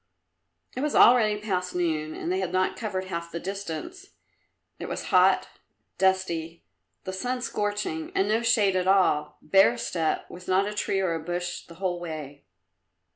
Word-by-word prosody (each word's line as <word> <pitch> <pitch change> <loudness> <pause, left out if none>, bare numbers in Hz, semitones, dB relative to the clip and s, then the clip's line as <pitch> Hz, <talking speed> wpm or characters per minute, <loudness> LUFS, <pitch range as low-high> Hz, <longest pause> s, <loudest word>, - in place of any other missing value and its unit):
It 255 - -3
was 295 0 -1
already 215 -4 +6
past 185 -4 -2
noon 155 -3 -1
and 170 - -3
they 185 - 0
had 185 -2 -2
not 185 0 +1
covered 190 -5 -3
half 170 -2 -5
the 170 - -4
distance. 200 - -6 0.7
It - - -6
was - - -5
hot, - - +4 0.5
dusty, 170 -4 0 0.4
the 185 - -5
sun 250 +7 -2
scorching 205 -8 -2
and 195 - +2
no 220 +2 +2
shade 215 -5 +3
at 185 0 0
all 185 -6 +2
bare 155 -9 +5
steppe, 155 +7 -1
with 180 +1 -11
not 190 +1 +3
a 210 - -3
tree 195 -2 -1
or 185 -3 0
a 165 - -2
bush 175 +1 -4
the 170 - -13
whole 180 -1 -2
way. 155 -4 -7
185 Hz, 170 wpm, -26 LUFS, 170-205 Hz, 0.7 s, already